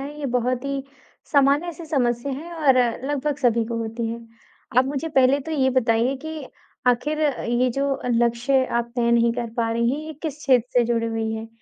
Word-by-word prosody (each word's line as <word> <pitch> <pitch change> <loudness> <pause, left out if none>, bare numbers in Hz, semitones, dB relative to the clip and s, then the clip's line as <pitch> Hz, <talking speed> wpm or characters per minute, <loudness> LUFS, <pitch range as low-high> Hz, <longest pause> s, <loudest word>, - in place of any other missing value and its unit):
हैं, 285 +2 -6
ये 290 - -3
बहुत 250 +2 -1
ही 275 -1 -2 0.5
सामान्य-सी 290 +4 +2
समस्या 260 -3 0
हैं 320 +6 -7
और 290 -5 +3 0.3
लगभग 290 0 -1
सभी 235 -4 +2
को 230 0 -4
होती 230 +1 -3
हैं। 230 0 -6 0.5
आप 255 - +5
मुझे 285 +3 -3
पहले 270 -1 +3
तो 320 +4 -6
ये 265 -3 +2
बताइए 245 +1 +2
कि 315 -2 -5 0.4
आखिर 295 +5 +1
अ, 280 -4 0
ये 240 +2 +1
जो 275 +3 0
अ, 250 - -5
लक्ष्य 240 +3 +2
आप 235 -1 -2
तय 235 -1 +2
नहीं 235 0 +3
कर 235 -1 -4
पा 230 -1 0
रही 235 +1 +1
हैं 280 - -2
ये 315 - -6
किस 305 -3 -4
क्षेत्र 255 -5 +2
से 240 - +4
जुड़ी 230 -1 0
हुई 225 -1 -2
है? 220 0 -5
255 Hz, 205 wpm, -23 LUFS, 235-280 Hz, 0.5 s, आप